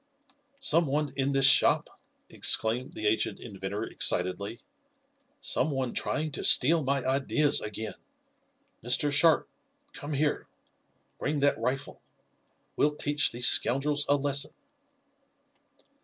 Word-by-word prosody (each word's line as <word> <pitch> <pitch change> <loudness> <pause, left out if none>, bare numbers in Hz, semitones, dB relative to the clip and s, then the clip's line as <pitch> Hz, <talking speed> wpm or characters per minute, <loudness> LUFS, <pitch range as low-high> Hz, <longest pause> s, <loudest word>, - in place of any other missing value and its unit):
"Some 170 - +2
one 145 +1 -2
in 135 0 -1
this 135 -1 +2
shop!" 135 - +3 0.3
exclaimed 120 +4 -1
the 110 - -7
aged 105 +1 0
inventor 100 -1 -6
excitedly. 100 +3 -2 0.8
"Some 145 - 0
one 135 -4 -3
trying 155 0 -3
to - - -6
steal 160 +4 +4
my 135 0 -1
ideas 140 +2 +1
again! 105 -1 -5 0.9
Mr. 125 +5 +1
Sharp, 155 +3 +4 0.5
come 145 +1 -7
here! 145 +1 -1 0.7
Bring 150 +1 -2
that 140 0 +2
rifle! 135 +2 -4 0.7
We'll 150 0 +1
teach 145 0 0
these 120 +1 -3
scoundrels 145 +3 +2
a 145 - +4
lesson!" 140 0 0
135 Hz, 115 wpm, -27 LUFS, 120-145 Hz, 0.9 s, steal